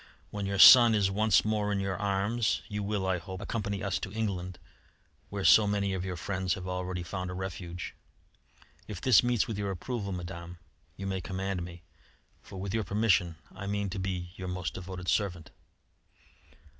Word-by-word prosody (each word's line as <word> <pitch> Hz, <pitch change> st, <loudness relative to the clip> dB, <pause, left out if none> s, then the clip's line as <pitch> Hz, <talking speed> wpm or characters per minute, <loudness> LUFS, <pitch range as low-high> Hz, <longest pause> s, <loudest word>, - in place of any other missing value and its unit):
When 100 Hz, -1 st, -3 dB
your 100 Hz, 0 st, -2 dB
son 120 Hz, +2 st, +10 dB
is 100 Hz, -2 st, +2 dB
once 110 Hz, +1 st, +3 dB
more 105 Hz, -1 st, 0 dB
in 100 Hz, -, 0 dB
your 95 Hz, -1 st, -2 dB
arms, 100 Hz, +4 st, 0 dB
you 105 Hz, 0 st, -4 dB
will, 100 Hz, -1 st, -2 dB
I 95 Hz, -2 st, 0 dB
hope, 95 Hz, +3 st, -8 dB
accompany 100 Hz, -1 st, -3 dB
us 95 Hz, -2 st, -1 dB
to 95 Hz, -, -6 dB
England, 95 Hz, -5 st, -3 dB, 0.7 s
where 100 Hz, -1 st, -4 dB
so 110 Hz, -2 st, +7 dB
many 100 Hz, -1 st, 0 dB
of 95 Hz, -1 st, -2 dB
your 90 Hz, -1 st, -4 dB
friends 95 Hz, +1 st, -1 dB
have 95 Hz, -1 st, -7 dB
already 90 Hz, -1 st, -3 dB
found 90 Hz, +1 st, -4 dB
a 90 Hz, -, -5 dB
refuge. 90 Hz, -2 st, -6 dB, 0.9 s
If 105 Hz, -5 st, -6 dB
this 125 Hz, +2 st, +6 dB
meets 120 Hz, -3 st, +1 dB
with 110 Hz, -3 st, -4 dB
your 100 Hz, -1 st, -2 dB
approval, 100 Hz, +2 st, -4 dB
Madame, 85 Hz, -1 st, -6 dB, 0.4 s
you 95 Hz, -, -6 dB
may 95 Hz, -1 st, -2 dB
command 95 Hz, +1 st, -3 dB
me, 85 Hz, 0 st, -8 dB, 0.6 s
for 95 Hz, -, -10 dB
with 95 Hz, +1 st, -4 dB
your 110 Hz, -1 st, 0 dB
permission 95 Hz, -4 st, +2 dB, 0.2 s
I 100 Hz, -, -7 dB
mean 100 Hz, -1 st, -2 dB
to 95 Hz, -, -4 dB
be 90 Hz, -2 st, -3 dB
your 95 Hz, -, -6 dB
most 90 Hz, -3 st, -3 dB
devoted 90 Hz, 0 st, -7 dB
servant." 90 Hz, -6 st, -1 dB
95 Hz, 180 wpm, -30 LUFS, 90-105 Hz, 0.9 s, son